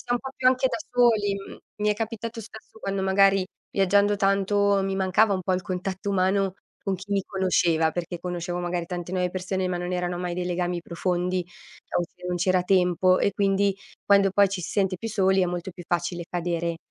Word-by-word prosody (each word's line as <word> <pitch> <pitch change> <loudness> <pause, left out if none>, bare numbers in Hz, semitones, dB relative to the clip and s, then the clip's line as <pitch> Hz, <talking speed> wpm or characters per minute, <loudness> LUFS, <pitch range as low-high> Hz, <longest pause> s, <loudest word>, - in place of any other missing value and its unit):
sta 245 - -2
un - - 0
po' 265 - -6
più 255 - 0
anche 255 0 +3
da - - -2 0.2
soli. 225 -5 +3
Mhmm, 195 0 -9 0.2
mi 210 0 0
è 210 - +3
capitato 225 +1 -4
spesso 220 0 -13
quando 195 -2 -2
magari 195 0 +4 0.3
viaggiando 200 +1 +3
tanto 200 0 +2
mi 195 0 -1
mancava 195 +2 +3
un 185 - -3
po' 185 - 0
il 185 0 0
contatto 185 +2 -3
umano 190 0 +1 0.3
con 195 - -1
chi 195 +2 -7
mi 200 -1 +1
conosceva, 175 -4 +2
perché 175 +1 -4
conoscevo 175 0 -4
magari 175 -1 -2
tante 175 0 -5
nuove 180 -1 0
persone 185 0 -2
ma 180 - -1
non 175 +1 -3
erano 180 0 -1
mai 180 0 -3
dei 180 0 -3
legami 175 0 -1
profondi, 180 +1 -1 0.5
o - - +1
se 180 +1 -10
non 180 0 -1
c'era 185 +1 +2
tempo, 185 0 +3
e 200 - +1
quindi 195 0 +1 0.3
quando 200 -1 +5
poi 200 +1 +4
ci 190 -2 -4
si 175 - -5
sente 195 -2 +1
più 225 +5 -5
soli, 190 -2 +2
è - - +2
molto 175 +1 -4
più 180 0 -11
facile 175 0 -1
cadere, 170 -1 -2
190 Hz, 210 wpm, -25 LUFS, 180-200 Hz, 0.5 s, quando